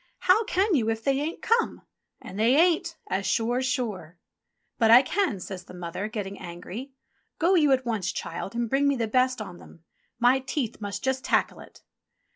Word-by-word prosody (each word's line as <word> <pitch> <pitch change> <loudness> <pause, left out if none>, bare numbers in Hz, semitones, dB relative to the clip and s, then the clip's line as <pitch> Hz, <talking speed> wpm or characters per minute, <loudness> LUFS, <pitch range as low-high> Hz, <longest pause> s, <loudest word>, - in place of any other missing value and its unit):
"How 390 +5 +4
can 395 0 +1
you 230 -7 +2
if 225 0 -2
they 275 -1 +1
ain't 310 +3 -4
come? 465 0 +1 0.4
And 195 - -9
they 235 +4 +4
ain't, 335 +1 +2
as 190 +1 -2
sure's 245 +3 0
sure." 210 - -3 0.6
"But 225 -2 +4
I 240 +3 +9
can," 355 - 0
says 185 0 -7
the - - -12
mother, 180 +3 -4
getting 200 -2 -5
angry. 180 +9 -8 0.5
"Go 350 +3 +3
you 305 -6 +4
at 260 -1 +2
once, 215 -6 -1
child, 195 - -6
and 235 0 -1
bring 275 +4 +2
me 280 - +2
the 230 -3 -1
best 255 +2 +2
on 190 -5 -8
them. 165 - -16 0.3
My 245 +2 +4
teeth 255 -4 -4
must 200 -1 -5
just 265 0 -1
tackle - - +1
it." - - -15
245 Hz, 190 wpm, -26 LUFS, 205-280 Hz, 0.6 s, I